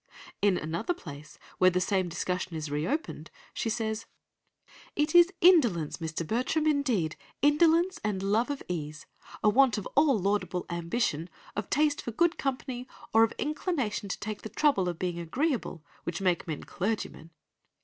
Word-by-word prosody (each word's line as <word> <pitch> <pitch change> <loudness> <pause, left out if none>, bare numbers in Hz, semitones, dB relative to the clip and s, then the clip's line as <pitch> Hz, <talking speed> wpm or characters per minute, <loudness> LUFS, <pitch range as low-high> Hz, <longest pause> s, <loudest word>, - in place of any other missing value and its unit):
In 200 -3 +3
another 170 - -2
place, 150 - -10 0.2
where 185 - +7
the 180 0 0
same 185 -1 0
discussion 180 0 -3
is 155 -2 -5
reopened, 180 - -2 0.2
she 230 - -2
says: 220 -1 -2 0.9
"'It 300 +1 +1
is 350 +1 +7
indolence, 240 - +4
Mr. 165 0 -4
Bertram, 255 - 0
indeed—indolence 295 - +2
and 200 -3 -1
love 215 +6 +2
of 285 -1 -4
ease—a 155 +4 -5
want 250 +1 +5
of 210 - -4
all 285 -4 +5
laudable 185 -2 -1
ambition, 170 -1 -1 0.3
of 210 -1 -3
taste 295 0 +2
for - - -5
good 340 +9 +1
company, 255 -2 -3 0.3
or 225 - +6
of 225 - +2
inclination 290 - -2
to - - -3
take 215 0 -5
the 220 - -7
trouble 215 -6 +2
of 175 - -4
being 175 -1 -2
agreeable, 225 - -2 0.2
which 170 0 -3
make 180 -1 +1
men 155 -3 -4
clergymen. 195 -5 -3
210 Hz, 150 wpm, -29 LUFS, 175-280 Hz, 0.9 s, where